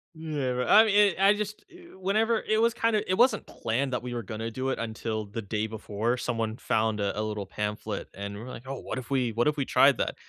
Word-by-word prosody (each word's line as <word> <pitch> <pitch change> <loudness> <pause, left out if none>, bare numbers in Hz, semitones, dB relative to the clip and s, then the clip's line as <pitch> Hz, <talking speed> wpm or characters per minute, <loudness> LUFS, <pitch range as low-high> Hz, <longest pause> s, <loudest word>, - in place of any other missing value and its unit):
Yeah, 150 -5 -2
but 125 0 -1
I 220 +1 +8
mean, 205 -2 +5
I 195 +1 +6
just 210 0 -5
eh, 355 0 -15
whenever 215 +4 +1
it 215 0 +1
was 230 0 +3
kinda 225 -2 +1
it - - +3
wasn't 250 +3 +4
planned 125 +4 -2
that 125 - -1
we 125 0 -5
were 120 - -3
gonna 115 0 -5
do 130 +4 -3
it - - -2
until 110 -1 -3
the 105 +3 -6
day 105 +2 -2
before 110 +2 -2
someone 115 -2 -2
found 110 -2 0
a 100 0 -1
a - - +1
little 105 -2 -3
pamphlet 105 +1 -4
and 100 +1 -6
we're 120 +4 -8
like, 125 +1 -9
"Oh, 135 0 -4
what - - -5
if 130 +1 -7
we 125 -4 +1
what 120 +4 +1
if 150 - +2
we 140 -3 -1
tried - - +5
that?" - - -1
125 Hz, 245 wpm, -28 LUFS, -, -, I